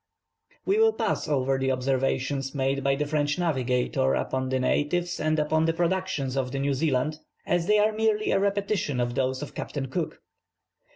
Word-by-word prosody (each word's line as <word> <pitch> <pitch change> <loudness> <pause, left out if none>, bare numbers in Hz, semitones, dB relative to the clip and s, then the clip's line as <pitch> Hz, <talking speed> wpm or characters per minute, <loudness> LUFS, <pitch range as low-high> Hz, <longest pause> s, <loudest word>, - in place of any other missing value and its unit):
We 400 +3 +2
will 445 0 +5
pass - - -1
over 135 -2 +1
the 135 0 +1
observations 135 +1 -1
made 135 0 0
by 135 0 +2
the 150 +2 -1
French 145 0 0
navigator 130 -5 +1
upon 130 0 -2
the 130 0 0
natives, 170 +7 0
and 155 0 +1
the 160 +2 +2
productions 175 -7 -1
of 130 -2 -1
New 140 +1 0
Zealand, 150 +1 0 0.3
as 175 0 0
they 210 0 +5
are 210 +1 +4
merely 215 -1 +1
a - - +3
repetition 200 -8 0
of 120 0 0
those 130 +2 -1
of 150 - -8
Captain 135 -3 -4
Cook. 165 +3 -3
145 Hz, 170 wpm, -26 LUFS, 130-175 Hz, 0.3 s, will